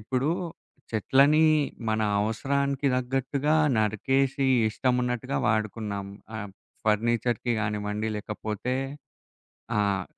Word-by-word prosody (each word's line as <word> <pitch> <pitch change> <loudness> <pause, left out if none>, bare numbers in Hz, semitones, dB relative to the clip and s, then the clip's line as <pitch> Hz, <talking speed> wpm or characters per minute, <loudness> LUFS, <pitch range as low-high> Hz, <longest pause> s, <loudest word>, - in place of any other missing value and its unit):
ఇప్పుడూ 130 +7 0 0.6
చెట్లని 140 +8 +4 0.4
మన 110 0 +1 0.2
అవసరానికి 140 +6 0
తగ్గట్టుగా 135 +4 0 0.2
నరికేసి 135 +6 +1 0.3
ఇష్టమున్నట్టుగా 125 +2 0
వాడుకున్నాం. 105 -2 -1 0.3
ఆహ్, 110 - -4
హ్మ్, 100 - -10 0.3
ఫర్నిచర్‌కి 120 +2 +1
గానివ్వండి, 105 0 -2
లేకపోతే 105 +3 -3 1.0
ఆహ్, 100 -2 +1
115 Hz, 85 wpm, -27 LUFS, 105-135 Hz, 1.0 s, చెట్లని